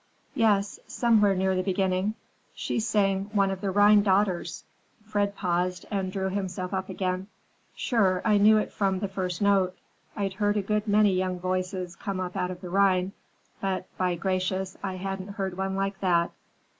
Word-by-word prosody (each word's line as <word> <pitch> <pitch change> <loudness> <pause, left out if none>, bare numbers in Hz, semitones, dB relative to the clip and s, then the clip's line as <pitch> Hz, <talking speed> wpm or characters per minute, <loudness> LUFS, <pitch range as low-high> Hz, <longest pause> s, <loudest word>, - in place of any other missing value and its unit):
"Yes, 210 -6 +2
somewhere 215 -5 +3
near 190 +1 +1
the 185 - +1
beginning. 190 +2 0 0.4
She - - -2
sang 195 -3 +1
one 195 -2 +3
of 190 -1 -5
the 200 - -1
Rhine 205 +2 +6
daughters." 190 -3 +1 0.4
Fred 205 -1 -1
paused 180 -1 -1
and 190 -2 -1
drew 190 0 -1
himself 185 -2 -3
up 190 0 -2
again. 185 0 -2 0.5
"Sure, 195 -7 +2
I 210 -2 +4
knew 215 +2 +6
it 210 - -1
from 195 -2 +1
the 200 +2 -2
first 185 -1 -3
note. 195 -2 +2 0.4
I'd 195 -2 -2
heard 205 +1 +1
a 205 - 0
good 210 +2 -1
many 205 -1 +4
young 185 -1 -1
voices 185 -1 -2
come 195 +1 -4
up 180 -1 -4
out 180 - -1
of 180 -1 -7
the 180 - -7
Rhine, 190 -1 +3 0.5
but, 190 -1 -1
by 180 -1 +1
gracious, 185 +1 -1
I 190 -2 -3
hadn't 195 +1 -5
heard 195 -3 -3
one 190 +1 -2
like 195 0 -2
that!" 170 -3 +2
190 Hz, 175 wpm, -27 LUFS, 185-200 Hz, 0.5 s, Rhine